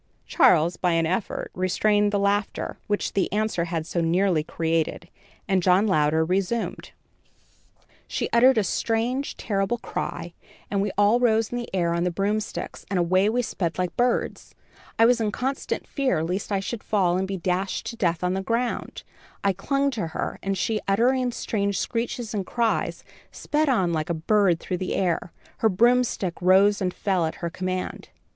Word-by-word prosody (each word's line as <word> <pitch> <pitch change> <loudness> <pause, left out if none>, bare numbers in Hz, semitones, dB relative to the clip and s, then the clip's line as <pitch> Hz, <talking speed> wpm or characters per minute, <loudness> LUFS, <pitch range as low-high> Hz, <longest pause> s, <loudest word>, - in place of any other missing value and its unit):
Charles, 170 +1 +4
by 180 -2 +1
an 165 0 +2
effort, 185 +5 -2
restrained 205 +3 +2
the 205 - +1
laughter, 200 0 -1
which 205 0 -1
the 195 - 0
answer 210 -4 0
had 165 -2 -3
so 170 - -2
nearly 170 0 +2
created, 165 +1 -2 0.4
and 190 -2 +2
John 185 +3 +4
Louder 160 -4 +2
resumed: 195 +6 -2 1.2
"She - - -2
uttered 250 +2 +6
a 215 - +3
strange, 235 +7 -1
terrible 200 +3 -1
cry, 175 -6 -5 0.4
and 200 -1 +1
we 205 - 0
all 205 +4 +4
rose 225 -3 +2
in 245 - -2
the 240 - -6
air 170 -3 0
on 170 0 0
the 180 - +1
broomsticks 205 +4 -3
and 195 - 0
away 185 +3 +3
we 245 +2 0
sped 170 -7 -3
like 180 -1 -2
birds. 245 0 -1 0.4
I 225 - +6
was 240 0 +4
in 215 -2 0
constant 265 +5 -3
fear 260 - 0
lest 185 +6 -3
I 195 -1 +1
should 225 +3 -5
fall 185 -5 +1
and 190 +1 -1
be 195 0 -3
dashed 185 +2 -2
to - - -10
death 175 -6 0
on 180 0 +1
the 190 - -1
ground. 235 +4 -2 0.4
I 200 -1 +3
clung 275 +9 0
to 215 -9 -3
her, 160 - -4
and 195 0 -2
she, 215 +3 -1
uttering 245 +5 +2
strange 200 -4 -2
screeches 235 -1 -3
and 200 -2 -1
cries, 230 +3 -1 0.3
sped 300 0 0
on 190 -9 +2
like 155 0 -2
a 170 - 0
bird 180 +1 +2
through 180 - -3
the 185 - -2
air. 175 -2 -1 0.3
Her 220 - +3
broomstick 230 -3 +1
rose 195 +3 +4
and 185 -1 0
fell 180 -3 0
at 160 - -5
her 170 - -3
command. 185 +1 -4
195 Hz, 180 wpm, -25 LUFS, 180-225 Hz, 1.2 s, uttered